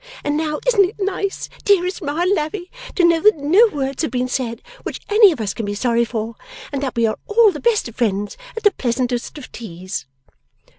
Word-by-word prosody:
And 290 Hz, 0 st, 0 dB
now, 305 Hz, -1 st, -1 dB
isn't 465 Hz, -5 st, +5 dB
it 420 Hz, -, -14 dB
nice, 390 Hz, 0 st, -2 dB, 0.2 s
dearest 375 Hz, -1 st, +2 dB
Ma 300 Hz, +1 st, -2 dB
and 365 Hz, +2 st, +3 dB
Lavvy, 350 Hz, +2 st, -3 dB, 0.2 s
to 365 Hz, -, +2 dB
know 335 Hz, -1 st, +4 dB
that 425 Hz, -2 st, +5 dB
no 345 Hz, +11 st, +5 dB
words 275 Hz, -1 st, -2 dB
have 315 Hz, -, 0 dB
been 250 Hz, +1 st, -1 dB
said 250 Hz, -3 st, -3 dB, 0.2 s
which -, -, -5 dB
any 420 Hz, -2 st, +7 dB
of 305 Hz, -, -5 dB
us 205 Hz, -3 st, -2 dB
can 230 Hz, -, -5 dB
be 205 Hz, 0 st, -3 dB
sorry 235 Hz, +1 st, +2 dB
for, 225 Hz, -1 st, -4 dB, 0.4 s
and 280 Hz, -2 st, -2 dB
that 270 Hz, -3 st, -3 dB
we 230 Hz, -1 st, +2 dB
are 220 Hz, -, -1 dB
all 435 Hz, 0 st, +5 dB
the 300 Hz, -, -7 dB
best 460 Hz, -, +2 dB
of 235 Hz, -, -12 dB
friends 205 Hz, -3 st, 0 dB, 0.2 s
at 450 Hz, -, -4 dB
the 415 Hz, -, +6 dB
pleasantest 245 Hz, -3 st, -2 dB
of 285 Hz, -, -10 dB
teas! 185 Hz, -, -6 dB
290 Hz, 215 wpm, -20 LUFS, 235-385 Hz, 0.4 s, any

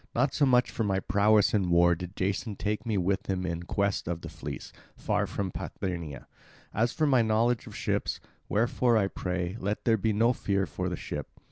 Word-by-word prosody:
Not 135 Hz, -1 st, +2 dB
so 145 Hz, -, +3 dB
much 125 Hz, -3 st, +4 dB
for -, -, -1 dB
my 95 Hz, -2 st, +1 dB
prowess 105 Hz, +2 st, +3 dB
in 100 Hz, -4 st, +2 dB
war 85 Hz, 0 st, +5 dB
did 90 Hz, +3 st, -6 dB
Jason 100 Hz, +3 st, -1 dB
take 105 Hz, +3 st, -2 dB
me 110 Hz, -3 st, +1 dB
with 95 Hz, +1 st, 0 dB
him 95 Hz, -1 st, -1 dB
in 85 Hz, -1 st, -2 dB
quest 100 Hz, +3 st, -1 dB
of 85 Hz, -1 st, -2 dB
the -, -, -7 dB
fleece, -, -, -7 dB, 0.2 s
far -, -, 0 dB
from 95 Hz, -2 st, -3 dB
Parthenia, 85 Hz, -7 st, -5 dB, 0.5 s
as 115 Hz, +3 st, +2 dB
for 155 Hz, -, +1 dB
my 130 Hz, -4 st, +4 dB
knowledge 115 Hz, +1 st, +1 dB
of -, -, -9 dB
ships. -, -, -1 dB, 0.3 s
Wherefore, 115 Hz, +2 st, +2 dB
I 105 Hz, -, +3 dB
pray, 90 Hz, +1 st, -3 dB
let 100 Hz, +2 st, -2 dB
there 115 Hz, -1 st, +4 dB
be 110 Hz, +2 st, +1 dB
no 115 Hz, +4 st, +3 dB
fear 100 Hz, -4 st, 0 dB
for 90 Hz, -1 st, -3 dB
the 90 Hz, -, -2 dB
ship. 75 Hz, -3 st, -5 dB
100 Hz, 205 wpm, -29 LUFS, 90-110 Hz, 0.5 s, war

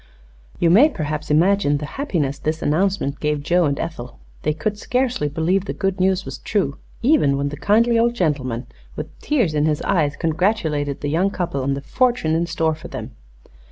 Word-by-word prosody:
You 170 Hz, -, +3 dB
may 250 Hz, -, +7 dB
perhaps 155 Hz, -, -4 dB
imagine 160 Hz, -1 st, +3 dB
the 150 Hz, -, -5 dB
happiness 160 Hz, -, -2 dB
this 155 Hz, +1 st, -2 dB
announcement 160 Hz, -2 st, 0 dB
gave 150 Hz, -1 st, -1 dB
Joe 175 Hz, +2 st, +3 dB
and 140 Hz, -1 st, -1 dB
Ethel. 125 Hz, -7 st, -6 dB, 0.2 s
They -, -, +1 dB
could 205 Hz, +7 st, -3 dB
scarcely 250 Hz, -, 0 dB
believe 170 Hz, +6 st, 0 dB
the -, -, -3 dB
good 195 Hz, -1 st, -2 dB
news 190 Hz, 0 st, +2 dB
was -, -, -7 dB
true, 190 Hz, -10 st, -1 dB, 0.2 s
even 190 Hz, -, +4 dB
when 140 Hz, 0 st, -1 dB
the 145 Hz, -, -6 dB
kindly 230 Hz, +5 st, +3 dB
old 235 Hz, +1 st, +2 dB
gentleman, 135 Hz, -, -1 dB, 0.3 s
with -, -, -7 dB
tears 240 Hz, -, +1 dB
in 150 Hz, 0 st, +2 dB
his 150 Hz, -1 st, 0 dB
eyes, 155 Hz, -6 st, +1 dB
congratulated 160 Hz, -4 st, 0 dB
the 145 Hz, -, -2 dB
young 175 Hz, +6 st, +2 dB
couple 175 Hz, -8 st, -3 dB
on 135 Hz, +1 st, 0 dB
the 140 Hz, -, -5 dB
fortune 245 Hz, -, +1 dB
in 170 Hz, +1 st, +1 dB
store 160 Hz, -1 st, 0 dB
for 155 Hz, -, -9 dB
them. -, -, -7 dB
160 Hz, 190 wpm, -21 LUFS, 145-200 Hz, 0.3 s, may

